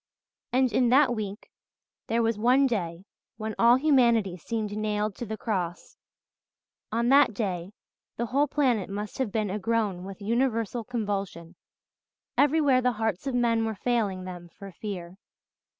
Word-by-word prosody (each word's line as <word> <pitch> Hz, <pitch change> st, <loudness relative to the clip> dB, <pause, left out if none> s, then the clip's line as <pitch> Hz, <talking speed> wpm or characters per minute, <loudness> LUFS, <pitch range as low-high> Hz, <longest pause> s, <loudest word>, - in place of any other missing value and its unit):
And 255 Hz, -1 st, +2 dB
in 250 Hz, -2 st, +3 dB
that 260 Hz, 0 st, +5 dB
week 210 Hz, -1 st, -6 dB, 0.6 s
there 230 Hz, +1 st, +1 dB
was 225 Hz, 0 st, +1 dB
one 255 Hz, +5 st, +4 dB
day 185 Hz, -7 st, -2 dB, 0.3 s
when 220 Hz, 0 st, -4 dB
all 235 Hz, +1 st, +7 dB
humanity 240 Hz, -, +3 dB
seemed 210 Hz, +4 st, -4 dB
nailed 210 Hz, 0 st, -1 dB
to 240 Hz, -, -5 dB
the 220 Hz, +1 st, -4 dB
cross; 180 Hz, -6 st, -3 dB, 1.0 s
on 235 Hz, +2 st, +1 dB
that 275 Hz, -5 st, +5 dB
day 190 Hz, -3 st, -3 dB, 0.4 s
the 235 Hz, -, -1 dB
whole 280 Hz, +5 st, +1 dB
planet 250 Hz, -10 st, +1 dB
must 205 Hz, +4 st, -5 dB
have 255 Hz, -6 st, -1 dB
been 210 Hz, -2 st, -1 dB
agroan 210 Hz, -2 st, -1 dB
with 195 Hz, +1 st, -8 dB
universal 230 Hz, +1 st, 0 dB
convulsion; 200 Hz, -7 st, -4 dB, 0.8 s
everywhere 285 Hz, -3 st, +4 dB
the 250 Hz, 0 st, +2 dB
hearts 220 Hz, +1 st, -2 dB
of 265 Hz, -, -1 dB
men 230 Hz, -2 st, +2 dB
were 220 Hz, -1 st, -2 dB
failing 205 Hz, -5 st, -1 dB
them 175 Hz, -2 st, -8 dB
for 195 Hz, -1 st, -9 dB
fear. 185 Hz, -1 st, -7 dB
220 Hz, 150 wpm, -27 LUFS, 195-245 Hz, 1.0 s, all